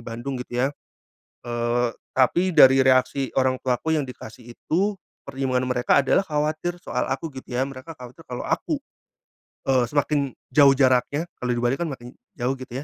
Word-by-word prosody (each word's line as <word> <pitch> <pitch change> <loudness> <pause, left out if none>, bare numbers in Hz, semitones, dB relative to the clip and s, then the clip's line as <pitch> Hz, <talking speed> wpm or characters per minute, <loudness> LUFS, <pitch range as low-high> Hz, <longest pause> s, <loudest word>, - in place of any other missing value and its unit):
Bandung 120 +3 -5
gitu 125 0 -2
ya. 140 - -1 0.7
Eee, 120 0 0 0.2
tapi 175 +8 +3
dari 135 -2 +8
reaksi 130 +1 +2
orang 130 -1 +2
tuaku 130 +5 0
yang 155 - +2
dikasih 120 -2 -10
itu 195 +4 0 0.3
pertimbangan 130 -2 -1
mereka 125 +3 +3
adalah 140 +8 +2
khawatir 155 +3 -2
soal 125 - -2
aku 135 +5 -3
gitu 130 - -9
ya, 125 - 0
mereka 135 +5 -9
khawatir 125 +6 -12
kalau 125 -1 -5
aku, - - -1 0.9
eee, 130 -2 +3
semakin 145 +2 +1 0.3
jauh 140 0 +7
jaraknya 130 +3 +2 0.2
kalau 125 - -2
di 120 - -2
Bali 120 +2 +2
kan 170 - -1
makin 125 -3 -8 0.2
jauh 125 0 0
gitu 130 +1 -6
130 Hz, 165 wpm, -24 LUFS, 125-145 Hz, 0.9 s, dari